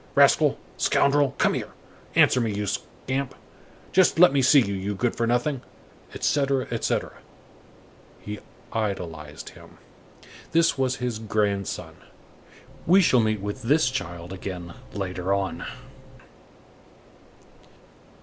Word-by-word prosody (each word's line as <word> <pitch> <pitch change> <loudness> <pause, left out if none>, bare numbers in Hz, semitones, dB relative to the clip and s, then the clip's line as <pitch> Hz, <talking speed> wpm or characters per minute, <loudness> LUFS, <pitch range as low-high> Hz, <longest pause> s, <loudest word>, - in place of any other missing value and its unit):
rascal, - - +5 0.2
scoundrel, 140 -1 +2
come - - +3
here!—Answer 125 - 0
me, 115 -2 0
you 105 0 -2
scamp! 125 +5 -4 0.6
Just 185 -3 +4
let 175 -4 +7
me 140 - +3
see 135 +3 +6
you, 100 -6 0
you 100 +1 -3
good 120 +4 -1
for 115 - 0
nothing!" 125 +3 0 0.5
etc., 140 -2 +1
etc. 115 - -2 1.0
He 105 0 -7 0.3
idolized 85 -8 -4
him. - - -16 0.8
This 165 -2 +4
was 130 -2 0
his 125 -4 -3
grandson. 105 -3 -2 0.9
We 185 +4 +7
shall 130 -8 +4
meet 110 -2 +1
with 105 +5 -5
this 135 +2 +3
child 90 -7 -5
again 90 -2 -6 0.2
later 95 -1 -2
on. 100 -1 -3
115 Hz, 110 wpm, -25 LUFS, 100-135 Hz, 1.0 s, let